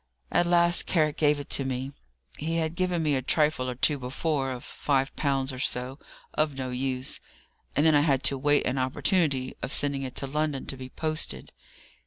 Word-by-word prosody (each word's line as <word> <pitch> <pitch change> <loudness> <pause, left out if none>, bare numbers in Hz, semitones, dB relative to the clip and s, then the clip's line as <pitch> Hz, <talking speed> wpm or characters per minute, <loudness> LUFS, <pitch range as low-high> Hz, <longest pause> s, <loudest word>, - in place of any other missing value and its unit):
At 175 - +3
last 175 0 +4
Carrick 155 -4 +2
gave 150 -1 +3
it 145 - -1
me 135 0 -2 0.4
he 165 +2 -3
had 160 -1 0
given 180 -1 0
me 150 -2 +2
a 130 - +1
trifle 150 -1 +1
or 125 - -4
two 145 +3 +2
before, 135 +2 -1
of 125 -2 -5
five 135 -1 -1
pounds 135 -2 0
or 130 - -7
so, 130 +1 -2 0.3
of 150 -3 0
no 130 -1 -3
use 130 +1 -2 0.6
and 145 - +3
then 160 - +6
I 145 - +5
had 140 -3 +2
to 140 - +3
wait 145 +1 +3
an 130 +1 0
opportunity 130 0 +1
of - - -4
sending 140 -1 +2
it 130 -2 -5
to - - -2
London 150 0 -1
to - - -4
be 130 -1 -8
posted. 155 - -3
140 Hz, 195 wpm, -27 LUFS, 130-155 Hz, 0.6 s, then